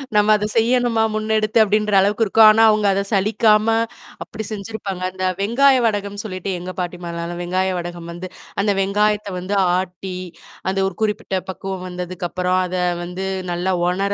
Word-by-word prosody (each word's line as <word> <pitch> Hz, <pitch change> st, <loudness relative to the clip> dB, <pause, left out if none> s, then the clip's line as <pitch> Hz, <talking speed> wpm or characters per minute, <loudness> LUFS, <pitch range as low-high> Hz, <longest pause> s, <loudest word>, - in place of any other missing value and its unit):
நம்ம 210 Hz, +1 st, +4 dB
அத 210 Hz, -, -2 dB
செய்யணுமா, 235 Hz, 0 st, +2 dB
முன்னெடுத்து 215 Hz, 0 st, +1 dB
அப்பிடின்ற 210 Hz, 0 st, +2 dB
அளவுக்கு 205 Hz, +3 st, +2 dB
இருக்கும். 220 Hz, +2 st, +6 dB
ஆனா, 220 Hz, +1 st, +4 dB
அவங்க 215 Hz, -1 st, +2 dB
அத 195 Hz, -, +1 dB
சலிக்காம 215 Hz, +1 st, +3 dB, 0.6 s
அப்பிடி 220 Hz, -, -7 dB
செஞ்சிருப்பாங்க. 200 Hz, -2 st, -5 dB
அந்த 185 Hz, 0 st, -6 dB, 0.2 s
வெங்காய 260 Hz, +6 st, +4 dB
வடகம்ன்னு 205 Hz, -2 st, -2 dB
சொல்லிட்டு 185 Hz, -1 st, -4 dB
எங்க 180 Hz, +1 st, -6 dB
பாட்டிமாலாம் 175 Hz, -1 st, -4 dB
நல்ல 175 Hz, +1 st, -5 dB
வெங்காய 185 Hz, +2 st, 0 dB
வடகம் 175 Hz, -1 st, -6 dB
வந்து 175 Hz, +2 st, -7 dB, 0.3 s
அந்த 205 Hz, +1 st, +2 dB
வெங்காயத்த 205 Hz, +1 st, +1 dB
வந்து 190 Hz, +3 st, -3 dB, 0.2 s
ஆட்டி, 185 Hz, 0 st, -5 dB, 0.5 s
அந்த 195 Hz, +1 st, -1 dB
ஒரு 195 Hz, -, -5 dB
குறிப்பிட்ட 210 Hz, -2 st, -1 dB
பக்குவம் 190 Hz, 0 st, -5 dB
வந்ததுக்கப்பறம் 180 Hz, 0 st, -2 dB
அத 180 Hz, 0 st, -4 dB, 0.3 s
வந்து 180 Hz, +2 st, -5 dB, 0.3 s
நல்லா 175 Hz, +2 st, -1 dB
உணர 195 Hz, +3 st, 0 dB
195 Hz, 155 wpm, -20 LUFS, 180-215 Hz, 0.6 s, இருக்கும்